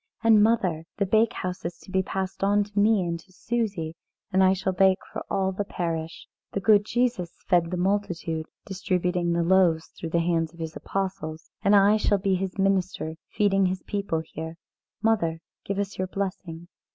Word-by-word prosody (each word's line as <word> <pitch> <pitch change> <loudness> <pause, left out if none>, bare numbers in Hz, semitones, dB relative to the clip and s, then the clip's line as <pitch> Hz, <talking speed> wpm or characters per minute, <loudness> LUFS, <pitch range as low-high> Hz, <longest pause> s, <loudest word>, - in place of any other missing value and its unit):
And, 220 -2 +6
mother, 190 -8 +2
the 200 - +1
bakehouse 195 -3 +1
is 170 0 -4
to - - -13
be 190 0 +2
passed 190 0 -4
on 205 +1 +3
to 205 0 -3
me 210 -1 +4
and 170 -1 -2
to 185 +3 -19
Susie, 195 -6 -2 0.4
and 190 0 +5
I 185 - +6
shall 190 0 -1
bake 190 +1 +4 0.2
for - - -4
all 190 -1 +1
the 190 +2 -2
parish. 165 -4 -4 0.3
The - - 0
good 205 0 +5
Jesus 235 -7 0
fed 175 -3 +3
the 180 - -2
multitude, 175 -4 -1 0.2
distributing 180 -2 -1
the 170 0 +1
loaves 170 -2 +3
through 165 - -7
the 170 - +1
hands 165 -1 0
of - - -17
His 160 -1 -5
apostles. 185 -5 -4
And 200 +1 +4
I 205 +2 +6
shall 210 -1 +2
be 195 0 0
His 185 0 -2
minister 190 -4 0 0.2
feeding 195 -2 +2
His 185 0 -3
people 200 -6 -2
here. 160 +1 -7 0.5
Mother, 170 -8 +2 0.3
give 200 - -2
us 200 -1 -3
your 185 - 0
blessing." 185 -3 -5
190 Hz, 185 wpm, -26 LUFS, 170-200 Hz, 0.5 s, And